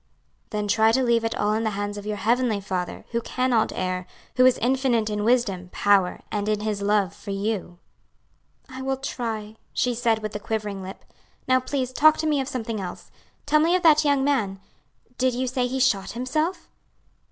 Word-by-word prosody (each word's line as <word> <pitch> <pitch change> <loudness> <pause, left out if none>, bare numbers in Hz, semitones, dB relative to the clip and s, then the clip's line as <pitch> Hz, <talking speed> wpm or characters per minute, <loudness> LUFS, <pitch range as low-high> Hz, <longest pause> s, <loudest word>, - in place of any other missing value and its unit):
"Then 210 -1 -2
try 220 +2 +4
to 260 +2 +3
leave 235 -2 +2
it 225 0 -1
all 210 +1 +1
in 220 +1 0
the 220 - +1
hands 205 0 -3
of 205 0 -7
your 210 -1 -2
heavenly 235 0 +1
Father, 185 -3 -4
who 235 0 0
cannot 255 -2 +1
err, 185 0 -2 0.3
who 255 0 +6
is 255 - +4
infinite 245 -3 +1
in 210 0 -1
wisdom, 210 -7 +1
power, 200 -3 +2
and 210 0 -1
in 210 -1 0
His 210 -1 -2
love 200 -1 +1
for 200 - -11
you." 195 -3 -3 0.9
"I 260 0 -8
will 265 0 -1
try," 225 -5 -4 0.2
she 250 - +1
said 225 -2 0
with 215 -1 -4
a - - -2
quivering 210 -2 -3
lip. 190 +1 -9 0.4
"Now 255 0 +4
please 255 -1 -3
talk 310 +3 +5
to 315 - -2
me 300 -3 +2
of 265 - -4
something 230 -6 -3
else. 180 -2 -8 0.3
Tell 300 +1 +4
me 330 +3 +3
of 365 - 0
that 310 -2 +6
young 285 -2 +2
man. 220 -9 0 0.6
Did 255 -1 +2
you 255 +1 -1
say 250 0 0
he 265 +2 -3
shot 225 -7 +1
himself?" 305 +9 -2
225 Hz, 200 wpm, -24 LUFS, 205-255 Hz, 0.9 s, who